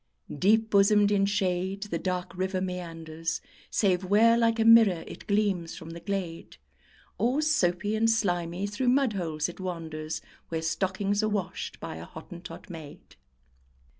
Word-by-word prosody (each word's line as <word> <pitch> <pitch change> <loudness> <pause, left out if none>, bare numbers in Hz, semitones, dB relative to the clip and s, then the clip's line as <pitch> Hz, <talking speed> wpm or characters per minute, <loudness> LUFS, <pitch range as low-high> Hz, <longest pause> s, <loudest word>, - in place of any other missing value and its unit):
Deep 220 +8 +3
bosomed 205 +1 +5
in 200 -1 +3
shade 190 -1 -1
the 170 -6 -3
dark 180 0 -3
river 185 +1 -1
meanders, 165 -3 -4 0.3
Save 190 -3 +2
where, 215 +5 +5
like 230 -1 +2
a 225 - +3
mirror, 225 -7 +7
it - - -10
gleams 200 -5 0
from 165 0 -9
the 170 - -7
glade; 180 -3 -4 0.6
Or 245 +7 +2
soapy 210 - +1
and 225 +1 +3
slimy 175 -4 0
through 205 +5 0
mud 260 -2 +3
holes 160 -5 -2
it 175 - -9
wanders, 160 -4 -4 0.3
Where 160 -1 -2
stockings 195 +4 0
are 215 - +1
washed 205 -3 -3
by - - -6
a 80 - -8
Hottentot 170 +4 -10
maid. 160 -6 -11
190 Hz, 150 wpm, -28 LUFS, 170-210 Hz, 0.6 s, mirror